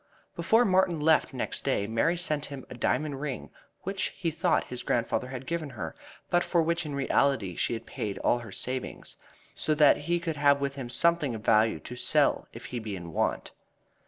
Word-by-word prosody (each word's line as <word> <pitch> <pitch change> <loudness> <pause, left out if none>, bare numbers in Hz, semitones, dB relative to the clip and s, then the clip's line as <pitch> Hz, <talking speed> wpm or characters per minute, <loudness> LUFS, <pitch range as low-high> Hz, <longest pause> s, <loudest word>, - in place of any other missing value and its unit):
Before 230 +2 +4
Martin 185 -3 +3
left 155 +1 +3
next 130 - -3
day 130 -7 +1
Mary 115 +11 +1
sent 155 -4 -1
him 140 -2 -8
a - - -4
diamond 140 +2 -1
ring, 140 -4 -4 0.3
which 195 0 -1
he 170 -3 -1
thought 165 +2 +1
his 125 - -7
grandfather 120 +1 0
had 130 0 -7
given 165 -2 -3
her, - - -5 0.4
but 175 - +4
for 170 - +1
which 170 0 0
in 145 - -4
reality 135 -8 +1
she - - 0
had 115 - -5
paid 100 -2 -4
all 120 - +2
her 115 -4 -9
savings, 130 +6 -4 0.4
so 155 - 0
that 150 -1 +6
he 170 +4 -1
should 165 -3 -3
have 140 -1 +4
with 140 0 -1
him 135 -3 -6
something 155 -1 +2
of 110 - -8
value 110 0 +4
to 125 - -8
sell 125 - +2
if - - -10
he 120 - -1
be 110 -3 -5
in 85 -3 -8
want. - - -1
140 Hz, 200 wpm, -28 LUFS, 120-165 Hz, 0.4 s, that